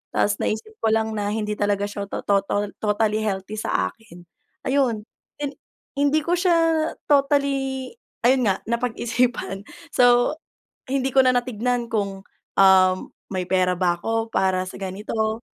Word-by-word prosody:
Ta's 205 0 +2
naisip 220 - -2
ko - - 0
lang 220 0 0
na 205 -2 -2
hindi 210 0 -2
talaga 205 -1 +1
siya 205 -1 -4
to - - -5
total 200 +1 0
totally 215 0 +1
healthy 210 0 -3
sa 95 - 0
akin. 180 -6 -16 0.4
Ayun, 255 -6 +1 0.4
hin 285 - -2 0.5
hindi 290 +2 +3
ko 340 - -2
siya 355 -2 +3 0.6
totally 275 -2 +1 0.3
ayun 250 -1 +4
nga 195 - 0
napag-isipan. 235 -3 -1 0.3
So, 245 +3 +4 0.6
hindi 270 -1 +1
ko 265 - +7
na 255 - +5
natingnan 245 -1 -1
kung, 200 -4 -2 0.4
um, 185 -1 +6 0.4
may 185 -1 -2
pera 185 -1 +2
ba 175 -2 +2
ako 225 +5 -2
para 185 -3 +1
sa - - -9
ganito, 220 +3 -3
220 Hz, 145 wpm, -23 LUFS, 200-250 Hz, 0.6 s, ko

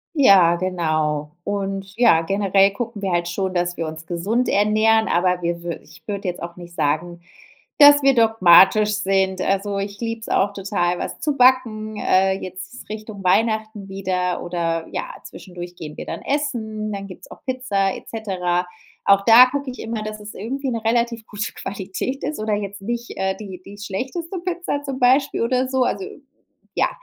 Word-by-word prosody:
Ja, 195 - +6
genau. 155 -5 -1
Und, 195 -1 -3
ja, 225 -9 +5
generell 195 +2 +3
gucken 225 -1 -5
wir 195 -2 -1
halt 175 0 0
schon, 190 +1 -2
dass 175 0 -1
wir 165 - -2
uns 160 +1 -8
gesund 200 +9 -1
ernähren, 215 +2 +3
aber 180 +1 +1
wir 170 0 -2
wür 170 -1 -4
ich 155 0 -18
würde 200 -1 -4
jetzt 180 - -4
auch 170 +1 -7
nicht 175 -1 -11
sagen, 170 +4 -1 0.6
dass 290 -1 +8
wir 275 0 +5
dogmatisch 210 -2 +5
sind. 190 -2 0
Also, 195 +1 0
ich 200 0 -5
liebe 230 -1 -3
es - - -8
auch 200 +1 +1
total, 180 -3 -1
was - - -5
zu 295 -2 -1
backen, 230 -4 +3
äh, 190 +1 +3
jetzt 185 +7 -9
Richtung 215 -1 -7
Weihnachten 215 +1 0
wieder 185 -2 -2
oder, 165 -2 -2
ja, - - -4
zwischendurch 175 -1 -10
gehen 150 -3 -8
wir - - -6
dann - - -6
essen, 225 -7 -2
dann 200 -1 -5
gibt's 185 -2 -12
auch - - -13
Pizza 230 -8 0
et - - -11
cetera. 180 -5 -2 0.4
Auch 200 0 +4
da 235 +3 +9
gucke 280 -1 -3
ich 250 - -10
immer, 225 -1 -4
dass 215 0 -6
es 210 0 -9
irgendwie 265 +6 -4
'ne 230 -2 -3
relativ 235 -1 0
gute 205 0 -4
Qualität 200 +7 -5
ist 295 -3 -3
oder 215 0 0
jetzt 200 -1 -5
nicht, 235 +3 -4
äh, 190 0 0
die 190 -4 -9
die 200 +2 -12
schlechteste 265 - -5
Pizza 345 -4 -3
zum 270 -2 -4
Beispiel 265 +2 +3
oder 255 +2 +1
so. 260 -1 +1
Also, 385 +9 -1 0.7
ja, - - +2
200 Hz, 180 wpm, -21 LUFS, 180-235 Hz, 0.7 s, da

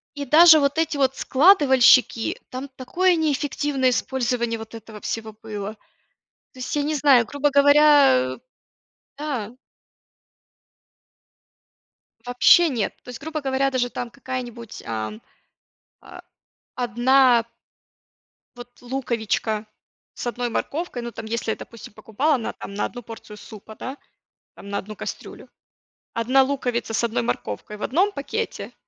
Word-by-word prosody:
И 285 -1 -5
даже 315 +3 +8
вот 280 +1 0
эти 320 -2 0
вот 270 -1 +1
складывальщики, 265 - +4
там 260 +2 -7
такое 355 +8 +1
неэффективное 290 -3 0
использование 240 -2 -1
вот 220 0 -10
этого 220 -1 -11
всего 220 -1 -5
было. 210 -1 -5 0.8
То 255 - -15
есть 250 - -4
я 290 - 0
не 305 +1 -1
знаю, 270 -4 +4
грубо 285 +5 0
говоря, 285 - +5
э, - - -16 0.8
да. 255 -7 -4 2.7
Вообще 250 +7 +5
нет. 235 -7 -2
То - - -13
есть, 250 - -8
грубо 310 +1 -4
говоря, 270 0 0
даже 250 -2 0
там 245 0 -5
какая-нибудь, 245 -3 -7
ам, 110 -1 -5 0.8
а - - -13 0.5
1 245 0 +3 1.1
вот 245 0 -13
луковичка 230 -4 -2 0.5
с - - -7
1 240 0 -2
морковкой, 290 +2 -3
ну, 235 - -6
там, 225 -1 -8
если 225 0 -2
я, - - -2
допустим, 230 -3 -11
покупала 265 +9 0
на 230 - -5
там 200 - -9
на 205 - -1
1 245 0 -8
порцию 220 -1 -11
супа, 215 +1 -12
да, 260 +5 -7 0.6
там, 200 - -12
на 200 0 -2
1 210 +2 -8
кастрюлю, - - -8 0.7
1 255 +4 +3
луковица 250 -4 -2
с 225 - 0
1 225 - -1
морковкой 120 - -4
в - - -8
1 365 - +1
пакете, 440 +8 -5
250 Hz, 135 wpm, -23 LUFS, 225-280 Hz, 2.7 s, даже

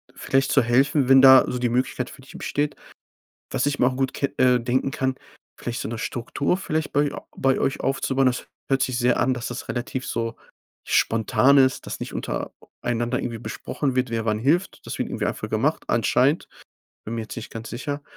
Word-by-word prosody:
vielleicht 135 0 +1
zu 135 - +5
helfen, 135 +3 +3
wenn 135 0 +8
da 130 -1 +9
so 125 - -2
die 120 -1 +1
Möglichkeit 125 +1 -1
für - - -13
dich 135 - -12
besteht. 145 0 -2 0.8
Was 125 - 0
ich 145 0 -1
mir 125 - +4
auch 130 - 0
gut 135 -1 -1
ke 140 - -2
äh, 125 -1 +4
denken 125 +3 0
kann, 130 -3 -1 0.4
vielleicht 120 -1 -4
so - - -4
'ne 115 - -4
Struktur 140 +9 -1
vielleicht 160 -4 -2
bei 145 0 +2
a - - -8
bei 135 0 +2
euch 135 - 0
aufzubauen. 135 0 +1
Das 125 - -1 0.2
hört 135 0 +2
sich 130 -2 -1
sehr 125 0 +2
an, 130 +2 +2
dass 120 -1 -4
das 125 - -7
relativ 125 +1 -3
so 115 0 -3 0.5
spontan 130 +5 +3
ist, 130 -1 +3
dass - - -6
nicht - - -5
unter - - -3 0.3
einander 120 +1 -1
irgendwie 115 -2 -4
besprochen 130 +3 -3
wird, 125 -1 +1
wer 115 -1 -2
wann 105 -1 0
hilft. 155 - 0
Das - - -5
wird - - -1
irgendwie - - -2
einfach - - -4
gemacht - - 0
anscheinend, - - +2 0.6
bin 110 - -5
mir 115 - -2
jetzt 110 - -8
nicht 115 - -7
ganz 115 0 -7
sicher. 145 +4 -4
130 Hz, 210 wpm, -24 LUFS, 120-135 Hz, 0.8 s, da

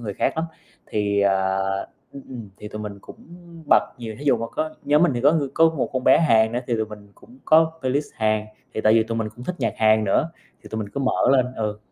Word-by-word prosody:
người 105 -4 -5
khác - - 0
lắm. 160 - 0 0.4
Thì, 100 -1 0
à 95 -1 +2 0.5
ừm, 140 - -10
ừm, 120 -6 -8
thì 105 - -9
tụi 105 0 -7
mình 100 -1 -7
cũng - - -13 0.5
bật - - +7 0.2
nhiều, 110 -2 -6
thí 145 - -9
dụ 140 - +4
mà 115 0 -4
có 155 0 -3
nhóm 150 +2 +3
mình 175 -5 +4
thì 120 - -2
có 145 +4 +5
ng 150 -4 0
có 165 0 +5
một 155 -2 -3
con 130 -1 -2
bé - - +6
Hàn 110 -8 +3
nữa, 120 - -1
thì 120 - 0
tụi 110 - 0
mình 105 -1 -12
cũng 245 +2 -19
có 160 +1 +4
playlist 135 +3 0
Hàn, 110 -1 0 0.3
thì - - -1
tại 110 0 +4
vì 115 - +5
tụi 115 +1 -4
mình 110 -1 -2
cũng 125 - -9
thích 180 - -3
nhạc - - 0
Hàn 110 0 +3
nữa, 105 +11 +1 0.3
thì - - -12
tụi 110 - -4
mình 105 - -5
cứ 140 - -5
mở 130 -1 +1
lên, 130 -2 +3
ừ. 105 -2 -3
115 Hz, 260 wpm, -23 LUFS, 105-140 Hz, 0.5 s, bật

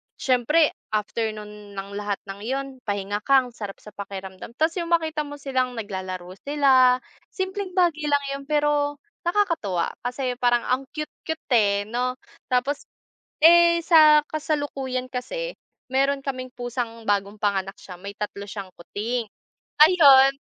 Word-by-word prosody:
siyempre 285 +5 +3 0.3
after 220 +2 -1
nun 210 -1 -10
ng 195 0 -6
lahat 205 -1 -2
ng 195 +1 -6
yun 270 +2 -2 0.2
pahinga 205 0 -2
ka, 275 -1 +6
ang 250 - -9
sarap 205 -4 -7
sa 210 - -10
pakiramdam, 195 +1 -8
tapos 320 +4 +1
yung 340 0 -4
makita 315 -2 0
mo 290 - -7
silang 260 -3 -1
naglalaro 185 -4 -5 0.2
sila, 260 -3 +5 0.4
simpleng 380 0 -3
bagay 335 -5 +2
lang 285 -1 +2
yun, 275 - -7
pero 295 -1 +1 0.3
nakakatuwa. 335 - +1 0.2
Kasi 250 0 -2
parang 240 -1 +3
ang 260 +2 +1
cute-cute, 310 +1 -6
eh, 200 -2 +2
'no? 250 +2 -1 0.3
Tapos, 255 +3 0 0.6
eh, 340 0 +7
sa 310 -3 +7
kasalukuyan 280 -4 -2
kasi, - - -4 0.3
meron 275 +1 +2
kaming 255 -2 -4
pusang 240 -2 -4
bagong 200 +1 0
panganak 195 -2 0
siya, 180 -2 -10
may 200 +3 -8
3 205 -1 -5
siyang 200 -1 -7
kuting, 225 +7 -3 0.6
ayun, 280 -5 +8
255 Hz, 140 wpm, -24 LUFS, 205-295 Hz, 0.6 s, ayun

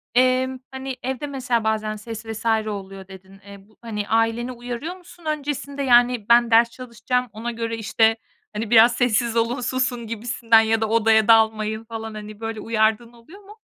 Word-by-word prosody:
emm, 255 +1 +2
hani, 265 0 -6
evde 265 +3 -3
mesela 255 -4 -1
bazen 215 -1 -1
ses 220 +1 -8
vs. 225 0 -7 0.2
oluyor 195 -2 -7
dedin. 190 0 -14
Eee, 200 0 -11
bu 215 - -27
hani, 210 -3 -5
aileni 225 +2 +1
uyarıyor 245 +7 -6
musun 350 -2 -17
öncesinde, 285 -2 -3
yani, 245 -3 +3
ben 235 0 +5
ders 230 +1 +5
çalışacağım 250 0 -3
ona 230 +3 -5
göre, 230 -1 -4
işte, 225 0 +2 0.4
hani, 215 +1 -4
biraz 235 +1 +6
sessiz 240 -1 +1
olun, 235 +3 0
susun 250 -1 -1
gibisinden 230 0 +2
ya 225 0 0
da 220 - 0
odaya 220 -1 +3
dalmayın 220 -1 +3
falan. 225 -1 -7
Hani, 210 0 -9
böyle 225 -1 -5
uyardığın 220 +1 0
oluyor 275 - -16
mu? 415 +2 -15
230 Hz, 170 wpm, -22 LUFS, 220-250 Hz, 0.4 s, biraz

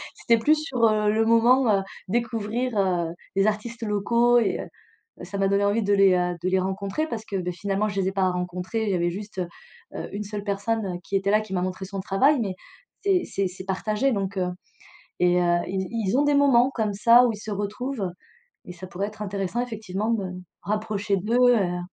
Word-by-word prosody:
C'était 235 - +2
plus 295 +8 +4
sur, 275 -6 -3
heu, 215 -1 +3
le 220 +1 +2
moment, 235 +3 +5
heu, - - -2 0.3
découvrir, 230 +1 -1
heu, 180 -3 +1 0.3
les 195 +2 +3
artistes 230 +3 -3
locaux 235 +3 +3
et 235 - 0
heu, - - -8 0.6
ça 190 +3 -6
m'a 195 0 +2
donné 200 +1 +2
envie 210 +3 +1
de 205 0 +2
les, 195 -2 +5
heu, 180 0 0
de 185 - 0
les 190 0 +2
rencontrer, 195 +10 -2
parce 225 -6 -5
que, 200 - -6
bah, 180 -1 -2
finalement, 200 +4 -1
je 200 -1 -3
les 185 - 0
ai - - -5
pas 190 -1 +2
rencontrés, 180 +5 -3
il - - -1
y - - +1
avait 175 -1 +1
juste, 200 +1 -7 0.6
heu, - - -5
une 210 - -3
seule 205 0 -6
personne, 200 -2 -2
qui 195 - -4
était 195 +1 0
là, 215 +1 +4
qui 215 -3 -8
m'a 180 - 0
montré 185 +1 -3
son 195 +1 -6
travail 235 +10 +2
mais 195 -4 -2 0.5
c'est 385 -3 +2
c'est 195 -1 -1
c'est 185 +1 -9
partagé 215 +7 0
donc, 200 -2 -2
heu 180 -1 0 0.7
et 180 0 +4
heu, 175 -1 +3
ils 190 0 -2
ils 225 -2 0
ont - - +4
des 290 0 +3
moments, 270 -3 +5
comme 215 -3 0
ça, 235 +4 +6
où 235 - 0
ils - - -6
se 215 - -7
retrouvent, 205 +1 -3 0.6
et - - -7
ça 180 +1 -9
pourrait 190 +2 -3
être 215 0 -9
intéressant 200 +2 -2
effectivement 220 -3 -3
de 215 -4 -1
me 185 0 -6 0.2
rapprocher 210 -1 -1
d'eux 240 +6 +4
et - - +3
heu 180 0 -3
205 Hz, 220 wpm, -25 LUFS, 190-230 Hz, 0.7 s, ça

